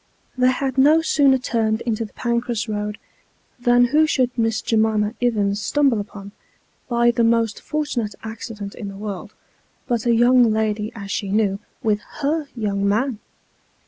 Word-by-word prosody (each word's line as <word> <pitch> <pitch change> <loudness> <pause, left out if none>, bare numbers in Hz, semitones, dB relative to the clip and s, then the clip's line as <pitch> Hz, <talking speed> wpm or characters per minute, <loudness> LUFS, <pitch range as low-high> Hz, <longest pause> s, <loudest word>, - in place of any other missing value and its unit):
They 255 0 +3
had 265 0 -1
no 310 +4 +5
sooner 280 -4 +4
turned 225 -4 -1
into 230 -1 -2
the 210 - -14
Pancras 235 -1 -1
Eoad, 210 -1 -3 0.6
than 245 0 +4
who 310 +1 +5
should 255 -4 +1
Miss 225 -2 0
J'mima 220 -1 +1
Ivins 205 -4 +1
stumble 275 -1 +2
upon, 200 -1 -8 0.6
by 240 0 +3
the 235 0 +1
most 230 -1 +1
fortunate 275 -9 -3
accident 220 -2 -7
in 210 - -7
the 195 0 -8
world, 205 0 -6 0.5
but 240 -2 -1
a 235 - +4
young 240 0 +5
lady 215 0 -1
as 200 -2 -7
she 200 - -2
knew, 200 -1 +1 0.2
with 210 -2 +1 0.2
Jier 300 +1 -1
young 200 -3 -1
man 230 +2 0
225 Hz, 155 wpm, -21 LUFS, 210-245 Hz, 0.6 s, no